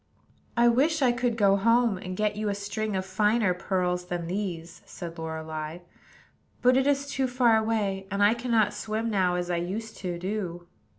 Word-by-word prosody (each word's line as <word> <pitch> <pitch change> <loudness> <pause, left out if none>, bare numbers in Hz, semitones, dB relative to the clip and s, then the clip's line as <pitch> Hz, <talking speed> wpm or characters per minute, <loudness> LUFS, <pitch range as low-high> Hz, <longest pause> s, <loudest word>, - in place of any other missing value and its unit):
"I 240 0 +5
wish 285 +6 +3
I 250 - +5
could 240 -1 -1
go 200 -2 +4
home, 230 -1 +3
and 185 0 -6
get 210 -1 0
you 210 0 -2
a 200 - -1
string 205 +1 -3
of 190 0 -1
finer 210 +1 +2
pearls 180 -1 -1
than 175 -1 -3
these," 175 -3 -4
said 170 -2 -8
Lorelei; 160 0 -5 0.9
"but 250 +1 +5
it 265 +1 +3
is 280 -1 +2
too 270 -2 -1
far 245 -2 +3
away, 210 -3 -1
and 200 0 +1
I 205 +2 +6
cannot 235 -3 +1
swim 220 +1 -3
now 185 -3 +2
as 180 0 -2
I 175 - +1
used 210 +6 -4
to 180 -2 -4
do." 180 -2 -4
205 Hz, 185 wpm, -27 LUFS, 180-230 Hz, 0.9 s, I